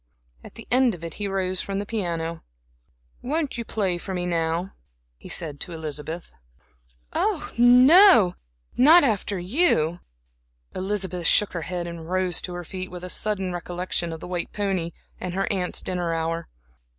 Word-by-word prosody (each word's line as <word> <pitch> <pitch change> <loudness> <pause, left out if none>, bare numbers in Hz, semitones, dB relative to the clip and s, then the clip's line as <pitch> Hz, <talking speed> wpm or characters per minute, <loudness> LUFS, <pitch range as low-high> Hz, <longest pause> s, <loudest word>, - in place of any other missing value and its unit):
At - - -13
the 230 - -11
end 250 -3 +4
of 170 - -13
it 165 -2 -5
he 205 - -1
rose 185 -1 -1
from 195 0 -4
the 200 - -3
piano. 170 -6 -3 0.8
"Won't 290 -1 -2
you - - -2
play 195 -6 -1
for 190 +2 -5
me 180 0 -2
now," 170 +1 -1 0.4
he - - -13
said 150 -3 -3
to 175 - -3
Elizabeth. 160 +1 -6 0.8
"Oh, - - -1
no, 250 - +7 0.4
not 310 +7 +7
after 210 -5 0
you." 180 - +2 0.7
Elizabeth 190 -3 -1
shook 210 - +3
her 170 - -3
head 175 -1 -3
and 170 -1 -8
rose 185 -2 +1
to 180 - -5
her 175 - -5
feet, 185 +2 -6
with 180 0 -9
a 180 - -6
sudden 195 -4 0
recollection 175 -1 -3
of 160 -1 -7
the - - -7
white 180 -1 -3
pony 195 -5 -1 0.3
and 180 -1 -5
her 195 - 0
aunt's 180 -2 -2
dinner 175 -2 -1
hour. 165 +1 -3
180 Hz, 165 wpm, -24 LUFS, 170-205 Hz, 0.8 s, no